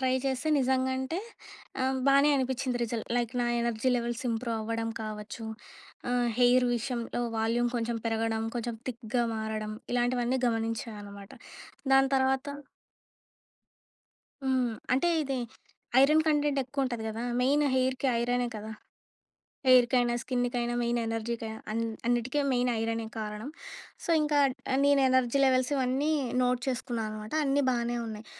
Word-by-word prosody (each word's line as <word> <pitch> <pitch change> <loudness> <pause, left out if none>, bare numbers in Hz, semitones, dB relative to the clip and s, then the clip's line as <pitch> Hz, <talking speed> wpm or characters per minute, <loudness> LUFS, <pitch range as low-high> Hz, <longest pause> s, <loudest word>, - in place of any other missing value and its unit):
Try 260 -1 +2
చేస్తే, 270 +3 -1
నిజంగా 260 0 +1
అంటే, 265 +7 -2 0.6
ఆహ్, 265 0 +1
బానే 280 +2 +6
అనిపించింది 260 -1 -1
రిజల్ట్. 230 -1 -4
లైక్ 240 0 0
నా - - +1
ఎనర్జీ 235 +2 0
లెవెల్స్ 240 +1 -3
ఇంప్రూవ్ 230 0 -2
అవ్వడం 225 +1 -2
కావచ్చు. 215 +1 -6 0.6
ఆహ్, 245 -1 +2
హెయిర్ 250 0 +5
విషయంలో 240 0 -3 0.2
వాల్యూమ్ 235 +2 +1
కొంచెం 230 0 -1
పెరగడం 225 0 0
కొంచెం 235 0 -3
థిక్‌గా 235 0 -1
మారడం 220 -1 -3 0.2
ఇలాంటివన్నీ 245 +1 +1
గమనించా 225 0 -1
అనమాట. 200 0 -11 0.6
దాని 270 0 +5
తర్వాత 265 +1 +1 2.0
హ్మ్. 255 -3 +1 0.2
అంటే 270 +7 +3
ఇది 270 -2 -2 0.6
ఐరన్ 305 +3 +5
కంటెంట్ 295 -2 +2
ఎక్కువుంటది 255 -3 -2
కదా! 225 +2 -4 0.2
మెయిన్ 285 +4 +3
హెయిర్‌కి 260 +1 +1
ఐరనే 245 +1 +1
కదా! 215 +1 -7 1.0
హెయిర్‌కైనా, 245 -1 +5
స్కిన్‌కైనా, 245 -1 -1
మెయిన్ 235 0 0
ఎనర్జీకైనా 225 0 -3
అన్ 230 +1 -1 0.3
అన్నిటికి 245 +4 +1
మెయిన్ 245 0 +2
ఐరనే 225 0 -1
కారణం. 215 +4 -5 0.5
సో, - - -7
ఇంకా 300 -1 +1 0.5
నేను 285 -1 +5
ఎనర్జీ 260 +1 +2
లెవెల్స్ 255 +1 +2
ఇవన్నీ 270 +3 +1 0.3
నోట్ 250 0 +1
చేసుకున్నాననమాట. 220 -2 -3
అన్నీ 280 +1 +2
బానే 240 0 -1
ఉన్నాయి. 220 0 -7
245 Hz, 125 wpm, -29 LUFS, 225-260 Hz, 2.0 s, బానే